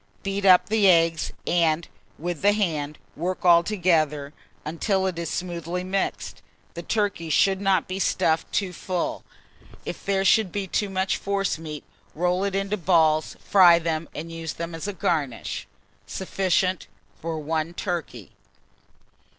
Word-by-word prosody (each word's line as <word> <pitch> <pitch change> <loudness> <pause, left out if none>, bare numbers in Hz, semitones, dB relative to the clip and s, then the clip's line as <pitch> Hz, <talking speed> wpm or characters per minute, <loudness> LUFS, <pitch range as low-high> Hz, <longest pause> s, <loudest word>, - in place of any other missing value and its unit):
Beat 195 0 -2
up 185 -2 +7
the 210 -3 +4
eggs, 165 -2 +3
and, 165 -1 +1 0.3
with 175 0 -4
the 205 +1 +4
hand, 155 -8 -1 0.2
work 180 +4 -3
altogether, 170 -5 +3 0.3
until 190 +5 0
it 180 -3 -2
is 170 - -3
smoothly 175 0 -3
mixed. 190 +1 -3 0.3
The 170 - -6
turkey 200 -4 -1
should 190 +5 +3
not 195 -1 +2
be 185 +1 -4
stuffed 165 -4 +1
too 190 -3 -1
full: 180 0 -3 0.6
if - - -6
there 195 -1 0
should 205 -1 +4
be 200 -1 -2
too 200 +2 -1
much 190 0 0
forcemeat, 165 -6 -2 0.3
roll 180 +3 +1
it 200 -1 -1
into 195 +1 -1
balls, 160 -4 +2
fry 180 -4 +7
them, 165 -1 -2
and 165 +2 -6
use 165 -1 -5
them 170 0 -6
as 165 +4 -5
a 205 - -3
garnish. 155 -8 -2 0.4
Sufficient 185 -1 0 0.3
for 165 0 -3
1 160 +2 -2
turkey. 170 - -4
175 Hz, 140 wpm, -25 LUFS, 165-195 Hz, 0.6 s, up